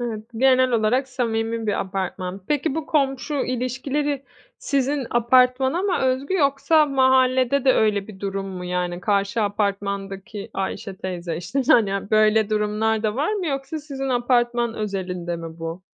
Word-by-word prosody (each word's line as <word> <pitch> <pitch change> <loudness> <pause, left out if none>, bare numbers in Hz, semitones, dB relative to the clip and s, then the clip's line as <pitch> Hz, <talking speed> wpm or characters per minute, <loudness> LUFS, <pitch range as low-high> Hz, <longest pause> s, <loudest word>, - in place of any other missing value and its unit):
Evet, 225 -3 -4
genel 255 +1 +4
olarak 240 +4 +2
samimi 230 -3 -2
bir 205 - 0
apartman. 190 0 -4
Peki, 295 -1 0
bu 320 -1 -3
komşu 275 -1 0
ilişkileri 270 +2 -2 0.3
sizin 275 -1 -1
apartmana 255 +6 +3
mı 390 -3 +1
özgü 265 +6 0
yoksa 285 0 +3
mahallede 260 -1 +3
de 260 - +6
öyle 210 -4 +1
bir 195 -3 -11
durum 195 -1 -3
mu? 185 -2 -6
Yani 180 0 -2
karşı 200 +3 0
apartmandaki 200 0 -3
Ayşe 195 0 -4
teyze, 175 -3 -4
işte, 195 +11 -2
hani, 200 -3 +3
böyle 215 0 +4
durumlar 215 +1 0
da 215 -1 0
var 300 +10 0
mı 400 -4 -2
yoksa 275 +1 -3
sizin 275 -3 -5
apartman 240 -1 +1
özelinde 180 -5 -3
mi 165 0 -8
bu? 165 +2 -6
230 Hz, 145 wpm, -23 LUFS, 200-270 Hz, 0.3 s, de